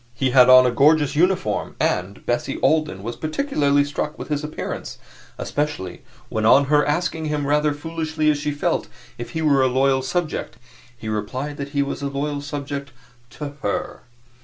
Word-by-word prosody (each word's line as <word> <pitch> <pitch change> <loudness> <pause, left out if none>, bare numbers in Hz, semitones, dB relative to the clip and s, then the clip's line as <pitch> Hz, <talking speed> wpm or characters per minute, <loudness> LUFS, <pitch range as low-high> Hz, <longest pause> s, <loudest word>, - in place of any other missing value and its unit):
He 130 +1 0
had 125 -1 +7
on 130 0 +9
a 125 - +3
gorgeous 145 +3 +3
uniform, 175 - +1
and 95 +3 -1
Bessie 120 +3 -1
Alden 155 -12 +1
was 115 +2 -4
particularly 155 - +1
struck 145 +1 -4
with - - -8
his 150 0 -1
appearance 150 +1 -5 0.4
especially 145 -12 -3 0.3
when 110 - -2
on 135 +6 +6
her 150 0 +5
asking 160 +1 -1
him, 150 -1 -1
rather 150 +1 +2
foolishly 160 +1 -3
as 145 - -2
she 150 +1 -2
felt, 145 0 -1 0.3
if 120 - -7
he 160 -1 -2
were 140 -3 +4
a 130 - +4
loyal 130 +1 +2
subject, 155 +5 -3 0.4
he 110 - -8
replied 130 +7 -3
that 140 0 -5
he 140 - +4
was 140 - -5
a 140 - -1
loyal 145 +1 -3
subject 145 -1 -5 0.4
to 150 +2 -6
HER. 100 - -3
145 Hz, 175 wpm, -22 LUFS, 130-150 Hz, 0.4 s, on